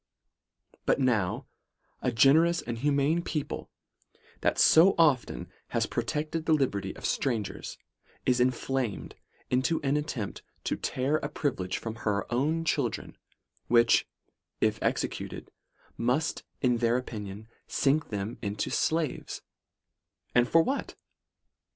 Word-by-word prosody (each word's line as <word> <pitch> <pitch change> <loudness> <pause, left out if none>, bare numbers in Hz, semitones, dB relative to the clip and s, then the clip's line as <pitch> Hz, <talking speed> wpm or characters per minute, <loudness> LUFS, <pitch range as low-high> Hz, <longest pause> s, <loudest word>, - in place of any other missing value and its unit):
But - - +3
now, 115 -9 +1 0.6
a 125 - +1
generous, 160 +9 +5
humane 140 +7 +1
people, 155 -4 -4 0.7
that - - +1
so 175 +5 +7
often 150 -7 +2 0.2
have - - -1
protected 155 +2 -2
the 160 - +5
liberty 130 -9 0
of - - -8
strangers, 115 -6 -2 0.5
is 125 -1 +3
inflamed 125 -2 -1 0.4
into 130 +6 +2
an 140 +1 +2
attempt 140 -9 -4 0.2
to - - 0
tear 135 +4 0
a 145 - -4
privilege 110 - -2
from 115 0 -5
her 100 -2 -1
own 155 +6 +1
children, 150 - -1 0.5
which 120 -1 +4 0.5
if - - +1
executed, - - -2 0.5
must, 125 +7 0 0.2
in 125 -2 +3
their 115 +1 +2
opinion, 105 -4 -6 0.2
sink 150 +2 +1
them 105 +1 -4
into 105 -1 -2
slaves: 160 -4 -1 0.9
and 125 0 +4
for 165 0 +5
what? 275 +8 -2
130 Hz, 115 wpm, -29 LUFS, 115-155 Hz, 0.9 s, so